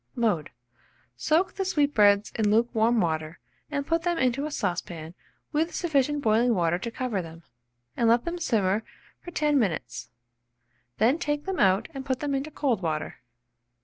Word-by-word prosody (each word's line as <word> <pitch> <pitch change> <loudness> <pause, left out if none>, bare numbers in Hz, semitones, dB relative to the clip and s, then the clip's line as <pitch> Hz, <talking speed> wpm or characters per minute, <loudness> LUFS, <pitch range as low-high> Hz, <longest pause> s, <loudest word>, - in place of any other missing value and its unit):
Mode. 210 -10 0 0.7
Soak 320 - +1
the 390 - -2
sweetbreads 225 - +3
in 215 -2 0
lukewarm 230 +1 +2
water, 160 -1 -2 0.3
and 285 -2 -2
put 330 +2 +1
them 345 0 0
into 260 +3 +1
a - - -7
saucepan 175 - -3 0.4
with 320 +3 0
sufficient 295 -3 +1
boiling 225 +1 +3
water 175 -1 +1
to 235 - -4
cover 230 -5 -2
them, 165 0 -11 0.5
and 230 - +2
let 235 +1 +3
them 345 +1 -3
simmer 210 - +1 0.4
for - - -10
10 300 -4 +2
minutes; 195 -9 -2 0.9
then 245 +9 +3
take 295 -3 -2
them 385 -1 -3
out 190 -1 +3
and 270 -1 -6
put 260 -1 -2
them 290 -1 -2
into 275 +3 -2
cold 265 -8 -1
water. 155 -5 -3
240 Hz, 160 wpm, -26 LUFS, 195-295 Hz, 0.9 s, sweetbreads